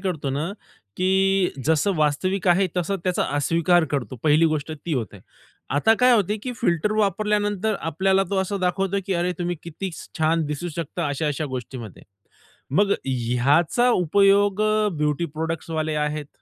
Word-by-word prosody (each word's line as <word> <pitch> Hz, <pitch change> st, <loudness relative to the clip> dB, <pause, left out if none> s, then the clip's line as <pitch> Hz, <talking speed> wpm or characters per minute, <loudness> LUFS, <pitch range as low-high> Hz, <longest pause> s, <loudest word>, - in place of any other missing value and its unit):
करतो 165 Hz, -8 st, -2 dB
ना, 145 Hz, +4 st, -2 dB, 0.5 s
की 190 Hz, 0 st, +2 dB
जसं 160 Hz, +5 st, +2 dB
वास्तविक 165 Hz, +6 st, 0 dB
आहे 185 Hz, +2 st, +4 dB
तसा 180 Hz, +3 st, 0 dB
त्याचा 180 Hz, -1 st, +1 dB
अस्वीकार 170 Hz, +3 st, +2 dB
करतो. 135 Hz, -2 st, -3 dB
पहिली 155 Hz, +2 st, +4 dB
गोष्ट 150 Hz, +1 st, -4 dB
ती 155 Hz, +2 st, -6 dB
होते. 105 Hz, -5 st, -4 dB, 0.6 s
आता 220 Hz, +9 st, +4 dB
काय 250 Hz, 0 st, +6 dB
होते, 210 Hz, -1 st, +2 dB
की 255 Hz, -, -4 dB
फिल्टर 190 Hz, 0 st, +1 dB
वापरल्यानंतर 210 Hz, 0 st, 0 dB
आपल्याला 190 Hz, +4 st, +1 dB
तो 200 Hz, -, 0 dB
असं 195 Hz, +1 st, -4 dB
दाखवतो, 190 Hz, +2 st, 0 dB
की 195 Hz, -, -1 dB
अरे 175 Hz, +1 st, 0 dB
तुम्ही 175 Hz, -1 st, -2 dB
किती 170 Hz, +3 st, -6 dB, 0.3 s
छान 160 Hz, 0 st, +2 dB
दिसू 150 Hz, +4 st, -4 dB
शकता 170 Hz, -1 st, -3 dB
अशा-अशा 150 Hz, +1 st, -2 dB
गोष्टींमध्ये. 120 Hz, -5 st, -8 dB, 0.7 s
मग 200 Hz, +6 st, +3 dB
ह्याचा 135 Hz, -, +2 dB
उपयोग 200 Hz, +2 st, +3 dB, 0.3 s
ब्युटी 150 Hz, +2 st, 0 dB
प्रॉडक्ट्सवाले 160 Hz, -1 st, -2 dB
आहेत, 150 Hz, -1 st, -4 dB
175 Hz, 145 wpm, -23 LUFS, 150-195 Hz, 0.7 s, काय